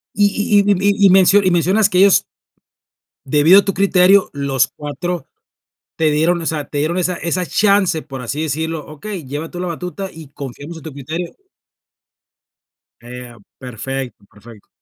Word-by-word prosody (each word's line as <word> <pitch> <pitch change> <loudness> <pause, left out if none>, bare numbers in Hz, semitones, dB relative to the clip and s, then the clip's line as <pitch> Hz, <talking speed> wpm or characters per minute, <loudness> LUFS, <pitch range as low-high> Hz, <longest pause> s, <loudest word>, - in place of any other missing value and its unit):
Y 205 - +3 0.3
y - - +7
y - - +5
m 200 -1 +2
y 200 - +4 0.2
y 195 - +7
me 190 +1 +6 0.2
y 185 - +2
mencionas 190 +5 +2
que 185 -2 +1
ellos, 195 0 +5 1.0
debido 150 +8 +5
a - - -9
tu 195 - -1
criterio 195 0 +4
los 140 -2 0
4, 160 +4 -5 0.7
te 160 -1 +2
dieron, 165 +4 +1
o 160 - -6
sea, 150 -2 -2
te 145 - -4
dieron 160 +5 -1
esa 180 0 0
esa 175 +1 -2
chance 200 -6 +2
por 135 -3 -9
así 140 +6 -4
decirlo: 160 +1 -3
"Okey, 170 +3 -8
lleva 145 +5 -6
tú 175 - -7
la 180 - -3
batuta 180 +3 -6
y 160 -3 -12
confiamos 145 +4 -9
en - - -14
tu 160 - -8
criterio". 155 +6 -6 1.7
Eh, 125 0 -10 0.2
perfecto, 125 -2 -6
perfecto. 105 0 -16
160 Hz, 170 wpm, -18 LUFS, 140-185 Hz, 1.7 s, y